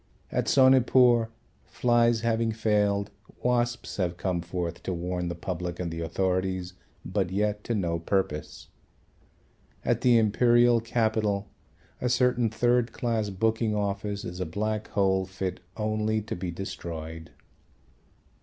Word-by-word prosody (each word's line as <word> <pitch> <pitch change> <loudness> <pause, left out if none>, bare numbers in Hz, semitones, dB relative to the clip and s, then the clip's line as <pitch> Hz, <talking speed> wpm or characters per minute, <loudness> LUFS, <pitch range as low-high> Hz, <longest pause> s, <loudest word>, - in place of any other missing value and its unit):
At - - -1
Sonepur 125 -3 +5 0.4
flies 120 -2 +2
having 115 -1 +1
failed, 105 -2 +1 0.3
wasps 120 0 0
have 90 -3 -1
come 90 -2 -1
forth 85 0 -4
to 95 - -3
warn 90 +1 -3
the 85 - -3
public 85 0 -4
and 85 -2 -3
the 80 - -5
authorities, 95 +1 -1 0.3
but 95 0 -1
yet 105 +2 -1
to 120 - -1
no 85 -5 -1
purpose. 80 -4 -2 1.2
At - - +1
the 125 -2 +5
Imperial 120 +2 +4
Capital 110 -3 0 0.5
a 125 - +1
certain 125 -1 +2
third 120 +1 +1
class 115 -4 -1
booking 110 +2 0
office 100 0 -2
is 90 +1 -6
a 90 - -1
Black 110 +5 -2
Hole 95 -1 +1
fit 95 -1 -4 0.2
only 110 0 0
to 110 - -5
be 90 0 -4
destroyed. 80 -3 -6
105 Hz, 130 wpm, -27 LUFS, 90-115 Hz, 1.2 s, Sonepur